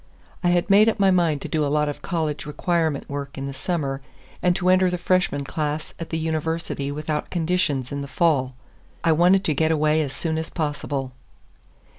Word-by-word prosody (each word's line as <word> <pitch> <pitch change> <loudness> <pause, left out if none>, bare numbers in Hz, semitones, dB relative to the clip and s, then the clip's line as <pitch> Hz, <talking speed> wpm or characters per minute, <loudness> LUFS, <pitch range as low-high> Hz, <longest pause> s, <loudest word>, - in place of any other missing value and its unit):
I 175 - +3
had 175 0 +2
made 210 +2 +6
up 225 - -2
my 195 -1 +5
mind 165 -6 +2
to - - -4
do 155 -1 0
a - - +1
lot 150 +1 +2
of 145 - -4
college 155 -4 -2
requirement 160 -1 0
work 140 -1 -5
in 135 - -4
the 140 - -4
summer, 140 -2 -2 0.4
and 180 -1 +3
to 185 0 +1
enter 185 0 +5
the 180 - -1
freshman 175 -5 +1
class 150 +2 -3
at 165 - -6
the 160 - -2
University 160 -2 -2
without 150 +1 -3
conditions 165 -7 0
in 140 0 -3
the 140 - -5
fall. 140 -6 +1 0.5
I 165 - +4
wanted 180 +4 +4
to 155 - +1
get 160 +3 +2
away 155 0 +3
as 145 -3 -2
soon 160 +2 -2
as 160 - -4
possible. 145 -4 -3
155 Hz, 200 wpm, -23 LUFS, 145-175 Hz, 0.5 s, made